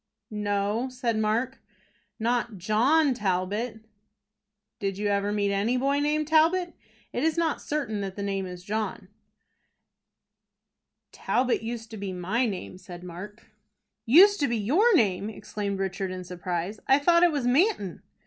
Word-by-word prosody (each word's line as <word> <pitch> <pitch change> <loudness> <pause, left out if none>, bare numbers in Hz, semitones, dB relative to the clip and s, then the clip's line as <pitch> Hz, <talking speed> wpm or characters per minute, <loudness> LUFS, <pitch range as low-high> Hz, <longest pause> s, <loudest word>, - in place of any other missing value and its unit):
"No," 210 +3 -1
said 245 -2 -2
Mark, 235 +5 0 0.6
"not 235 -1 -1
John 255 - +3
Talbot." 210 +2 -2 1.0
"Did 195 -1 -2
you 205 0 -1
ever 200 0 0
meet 205 -1 0
any 215 +6 +1
boy 275 +2 +1
named 300 +1 0
Talbot? 335 +3 +3 0.4
It 245 - -1
is 320 +1 +1
not 330 -3 0
certain 260 -9 -2
that 195 -1 -5
the 200 - -4
name 195 -1 -2
is 180 -1 -9
John." 205 -1 -3 2.0
"Talbot 250 -2 0
used 230 0 -6
to 220 - -7
be 195 -2 -4
my 200 +8 0
name," 185 -2 -6
said 175 -2 -10
Mark. 190 +6 -10 0.6
"Used 390 - +7
to 285 - +2
be 235 - 0
your 350 - +3
name!" 200 - +2
exclaimed 205 -1 -4
Richard, 195 0 -2
in 185 0 -6
surprise. 180 +3 -4
"I 270 - +6
thought 340 +4 +4
it 350 -1 +5
was 285 -5 -2
Manton." 250 - +1
215 Hz, 150 wpm, -27 LUFS, 195-270 Hz, 2.0 s, Used